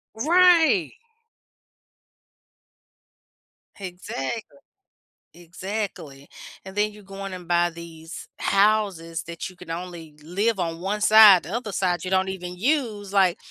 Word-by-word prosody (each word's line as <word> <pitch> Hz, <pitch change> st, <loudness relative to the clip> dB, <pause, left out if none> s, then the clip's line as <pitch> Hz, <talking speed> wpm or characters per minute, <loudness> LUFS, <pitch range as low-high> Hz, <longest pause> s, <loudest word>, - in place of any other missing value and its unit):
Right. 320 Hz, -, +4 dB, 2.9 s
Exactly. 185 Hz, -, -6 dB, 0.8 s
Exactly. 175 Hz, -5 st, -7 dB, 0.4 s
And 190 Hz, -, -10 dB
then 210 Hz, +1 st, +1 dB
you 210 Hz, -1 st, -15 dB
go 195 Hz, 0 st, -9 dB
in 195 Hz, -, -6 dB
and 180 Hz, -2 st, -9 dB
buy 175 Hz, 0 st, +2 dB
these 165 Hz, 0 st, -11 dB
houses 195 Hz, -5 st, +1 dB
that 170 Hz, +1 st, -7 dB
you 185 Hz, -, -16 dB
can 175 Hz, -2 st, -10 dB
only 170 Hz, -2 st, -7 dB
live 195 Hz, +6 st, -1 dB
on 165 Hz, -1 st, -3 dB
1 200 Hz, +3 st, -2 dB
side, 210 Hz, -3 st, +7 dB
the 175 Hz, -, -8 dB
other 235 Hz, -4 st, -4 dB
side, 180 Hz, -4 st, -1 dB
you 185 Hz, -, -5 dB
don't 190 Hz, 0 st, +2 dB
even 180 Hz, -2 st, -6 dB
use, 220 Hz, -5 st, -1 dB
like, 190 Hz, -3 st, +3 dB
190 Hz, 125 wpm, -24 LUFS, 170-210 Hz, 2.9 s, side